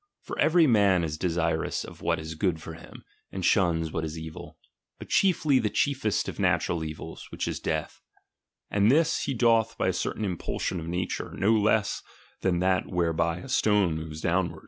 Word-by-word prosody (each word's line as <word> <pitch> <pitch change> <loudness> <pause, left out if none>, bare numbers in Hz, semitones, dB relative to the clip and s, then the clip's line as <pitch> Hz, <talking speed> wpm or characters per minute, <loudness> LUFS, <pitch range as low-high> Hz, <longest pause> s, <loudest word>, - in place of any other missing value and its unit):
For - - -6
every 165 +1 +5
man 100 - +4
is 80 -2 -2
desirous 85 -2 0
of - - -11
what - - +1
is 80 +1 -6
good 80 0 0
for 80 - -8
him, 80 - -13 0.3
and 95 -2 -3
shuns 85 -5 +2
what 80 - -2
is 80 0 -4
evil, 80 -1 -9 0.4
but - - -11
chiefly 155 -8 +3
the 105 - 0
chiefest 120 -1 0
of - - -6
natural 85 -2 +1
evils, 80 -1 -7
which - - -4
is - - -3
death; 80 -1 -3 0.7
and 100 +1 +3
this 160 +4 +3
he 135 - -2
doth 115 -1 +3
by - - +1
a - - 0
certain 110 - -2
impulsion 90 -1 -3
of 80 - -7
nature, 90 +2 -3
no 105 +3 +3
less 110 -1 +2 0.4
than 95 -2 +1
that 95 0 +1
whereby 85 -1 0
a 135 - -9
stone 105 -8 +2
moves 80 0 -6
downward. 85 -1 0
90 Hz, 185 wpm, -27 LUFS, 80-110 Hz, 0.7 s, every